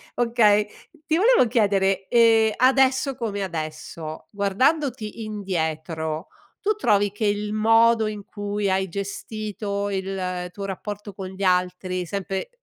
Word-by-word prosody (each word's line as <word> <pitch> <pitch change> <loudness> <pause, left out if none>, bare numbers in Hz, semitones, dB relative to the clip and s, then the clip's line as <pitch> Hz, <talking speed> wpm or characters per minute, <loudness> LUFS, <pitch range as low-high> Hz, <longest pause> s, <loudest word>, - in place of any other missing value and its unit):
okay. 220 -3 +3 0.4
Ti 320 - +2
volevo 440 - +5
chiedere, 195 -4 +1
ehm, 225 -2 +5
adesso 265 +1 +3
come 215 -5 -3
adesso, 155 -2 -6
guardandoti 225 +3 0
indietro, 160 -5 -3 0.3
tu 425 +1 +2
trovi 205 - +2
che 210 +1 -3
il 205 0 -1
modo 225 +1 +4
in 210 -2 -6
cui 205 -1 -3
hai 190 0 0
gestito 200 +1 -4
il 185 -2 -3
tuo 200 +2 -6
rapporto 205 +1 -6
con 190 0 -6
gli 190 +1 -7
altri, 180 0 0
sempre 195 - -3
205 Hz, 125 wpm, -24 LUFS, 190-225 Hz, 0.4 s, volevo